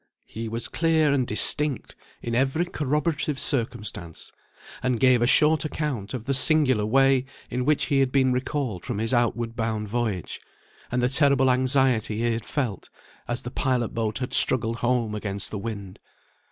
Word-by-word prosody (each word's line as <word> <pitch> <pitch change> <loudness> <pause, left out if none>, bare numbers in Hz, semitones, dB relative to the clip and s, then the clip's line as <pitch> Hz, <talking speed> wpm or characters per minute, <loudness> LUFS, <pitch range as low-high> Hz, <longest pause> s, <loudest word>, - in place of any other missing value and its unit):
He 110 0 -6
was 115 +2 -3
clear 160 -3 +2
and 130 -3 +1
distinct 145 +5 -1 0.3
in 120 - -3
every 135 +7 +1
corroborative 150 -1 -1
circumstance, 110 - -3 0.5
and 125 -2 0
gave 130 -2 +4
a 120 - +3
short 155 +2 +4
account 145 -9 -3
of 120 - -5
the 135 - -1
singular 135 -7 +2
way 135 +2 +3 0.3
in 125 +1 -1
which 150 0 +2
he 140 - +1
had 135 -1 +2
been 130 -2 +3
recalled 130 -7 -2
from - - -4
his 115 +4 -1
outward 120 -1 0
bound 110 -2 -2
voyage, 110 -5 -3 0.5
and 125 0 0
the - - +4
terrible 135 -2 +4
anxiety 130 -4 +2
he 120 +1 +1
had 115 -1 -5
felt, 120 -10 -3 0.4
as 120 0 -3
the 120 - -6
pilot 125 -4 0
boat 110 -1 -2
had 125 -1 -4
struggled 115 -2 +3
home 120 -2 0
against 100 -2 -3
the 105 - -4
wind. 100 -3 -6
125 Hz, 165 wpm, -25 LUFS, 115-135 Hz, 0.5 s, gave